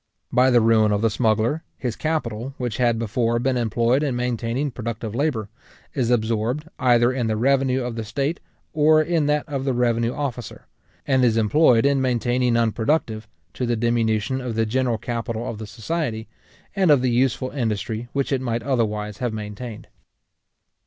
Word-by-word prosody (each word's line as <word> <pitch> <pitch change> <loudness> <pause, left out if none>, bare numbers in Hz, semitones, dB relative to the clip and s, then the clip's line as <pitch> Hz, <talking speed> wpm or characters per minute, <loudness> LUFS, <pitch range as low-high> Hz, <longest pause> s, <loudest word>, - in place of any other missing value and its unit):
By 125 +1 +4
the 120 -2 +5
ruin 110 -1 +4
of 105 0 +1
the 115 - +3
smuggler, 115 +6 +1 0.2
his 120 -4 -3
capital, 135 -5 -3
which 120 -3 -3
had 120 -3 +2
before 115 +1 0
been 130 +2 0
employed 120 +2 +1
in 140 -5 -1
maintaining 125 +3 -2
productive 115 -3 -5
labour, 120 -5 -1 0.5
is 125 -5 0
absorbed 115 +5 0
either 120 -1 +4
in 125 -3 -1
the 110 -1 0
revenue 130 +1 +2
of 120 -1 -4
the 115 - -3
state, 140 +9 -2 0.3
or 155 0 +5
in 155 -1 +1
that 150 0 0
of 140 -2 -3
the 135 -1 0
revenue 120 -1 +1
officer; 125 -4 -5 0.4
and 130 -2 +2
is 115 -2 +3
employed 115 +2 +4
in 140 -1 +3
maintaining 125 -1 +1
unproductive, 115 0 0 0.3
to 125 - -3
the 120 - +1
diminution 115 +1 0
of 125 -3 -4
the 115 0 +1
general 120 +1 0
capital 115 0 -4
of 110 - -5
the 110 - -7
society, 115 +1 -3 0.5
and 190 -3 +2
of 140 -4 +5
the 125 - +2
useful 130 +1 +1
industry 110 -2 -3
which 140 0 -1
it 135 -2 +1
might 120 -2 -2
otherwise 105 -5 -1
have 120 -3 -2
maintained. 110 +1 -7
120 Hz, 175 wpm, -23 LUFS, 115-130 Hz, 0.5 s, the